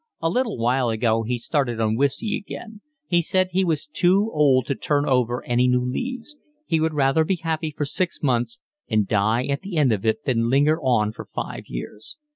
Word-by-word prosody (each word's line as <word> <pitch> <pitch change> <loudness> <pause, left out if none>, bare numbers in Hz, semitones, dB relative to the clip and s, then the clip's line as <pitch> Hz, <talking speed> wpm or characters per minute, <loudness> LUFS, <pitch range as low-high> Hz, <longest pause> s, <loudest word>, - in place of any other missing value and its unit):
A 165 0 0
little 245 - 0
while 120 +2 +1
ago 115 0 +1
he 120 +2 -2
started 120 -2 -1
on 110 -1 +1
whiskey 140 - 0
again. 215 +1 -8 0.2
He 175 -7 +2
said 185 +2 +1
he 190 +2 +2
was 155 -4 0
too 185 +7 +2
old 135 -5 +4
to 140 - -1
turn 145 +1 0
over 125 -2 +1
any 125 +1 +2
new 125 0 +2
leaves. 250 - -4 0.3
He 165 - +1
would 160 0 0
rather 140 +2 +3
be 190 +4 0
happy 160 -2 -2
for 150 0 -3
six 175 +4 -2
months 130 - 0 0.3
and 110 -4 +2
die 110 +5 +1
at 140 0 -2
the 190 -3 -5
end 140 -5 +4
of 105 -3 -1
it 110 +6 0
than 115 -3 +1
linger 145 +5 +3
on 120 -6 +2
for - - -9
five - - -5
years. 105 - -6
140 Hz, 205 wpm, -23 LUFS, 120-165 Hz, 0.3 s, old